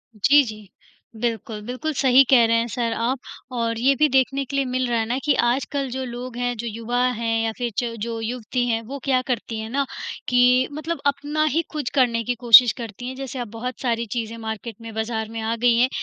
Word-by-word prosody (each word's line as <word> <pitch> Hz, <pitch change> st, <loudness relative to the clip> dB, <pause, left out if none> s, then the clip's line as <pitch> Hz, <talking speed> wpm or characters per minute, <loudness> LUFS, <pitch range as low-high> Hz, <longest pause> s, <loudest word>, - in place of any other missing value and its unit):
जी, 280 Hz, +7 st, +5 dB
जी। 215 Hz, -4 st, -9 dB, 0.5 s
बिल्कुल, 225 Hz, -2 st, -3 dB
बिल्कुल 275 Hz, +6 st, -3 dB
सही 265 Hz, 0 st, +6 dB
कह 240 Hz, -4 st, +6 dB
रहे 230 Hz, 0 st, +3 dB
हैं 230 Hz, +1 st, 0 dB
सर 235 Hz, -2 st, -1 dB
आप, 245 Hz, +3 st, -1 dB, 0.3 s
और 230 Hz, -2 st, -1 dB
ये 270 Hz, +3 st, +4 dB
भी 305 Hz, +2 st, +4 dB
देखने 270 Hz, +1 st, +2 dB
के 275 Hz, -, -6 dB
लिए 275 Hz, -1 st, +1 dB
मिल 255 Hz, 0 st, -1 dB
रहा 235 Hz, -1 st, +1 dB
है 220 Hz, -, 0 dB
ना 245 Hz, +3 st, -1 dB
कि 295 Hz, -, +3 dB
आजकल 270 Hz, +2 st, -1 dB
जो 260 Hz, +1 st, -3 dB
लोग 245 Hz, 0 st, -7 dB
हैं, 245 Hz, 0 st, -1 dB
जो 235 Hz, +1 st, -4 dB
युवा 230 Hz, +3 st, -2 dB, 0.2 s
हैं 225 Hz, -1 st, 0 dB
या 225 Hz, -, 0 dB
फिर 240 Hz, -2 st, -2 dB
च 240 Hz, -2 st, 0 dB
जो 230 Hz, 0 st, -3 dB
युवती 245 Hz, +1 st, -2 dB
हैं 225 Hz, -1 st, 0 dB
वो 280 Hz, -, -5 dB
क्या 260 Hz, -2 st, +2 dB
करती 230 Hz, -2 st, -2 dB
हैं 220 Hz, 0 st, -5 dB
ना 275 Hz, +2 st, 0 dB, 0.4 s
कि 250 Hz, +1 st, +4 dB
मतलब 320 Hz, +3 st, -4 dB
अपना 290 Hz, +2 st, 0 dB
ही 330 Hz, -, +4 dB
कुछ 300 Hz, -5 st, -3 dB
करने 235 Hz, -3 st, +2 dB
की 245 Hz, +2 st, -1 dB
कोशिश 235 Hz, 0 st, +9 dB
करती 235 Hz, +1 st, -7 dB
हैं, 260 Hz, -, -5 dB
जैसे 265 Hz, -1 st, -6 dB
आप 240 Hz, -, -4 dB
बहुत 250 Hz, +2 st, -5 dB
सारी 235 Hz, -2 st, 0 dB
चीज़ें 230 Hz, -1 st, -3 dB
मार्केट 220 Hz, 0 st, -6 dB
में 225 Hz, -1 st, -8 dB
बाज़ार 220 Hz, 0 st, -2 dB
में 225 Hz, 0 st, -6 dB
आ 225 Hz, +1 st, -1 dB
गईं 235 Hz, 0 st, +3 dB
है 255 Hz, -, +4 dB
245 Hz, 230 wpm, -23 LUFS, 230-260 Hz, 0.5 s, कोशिश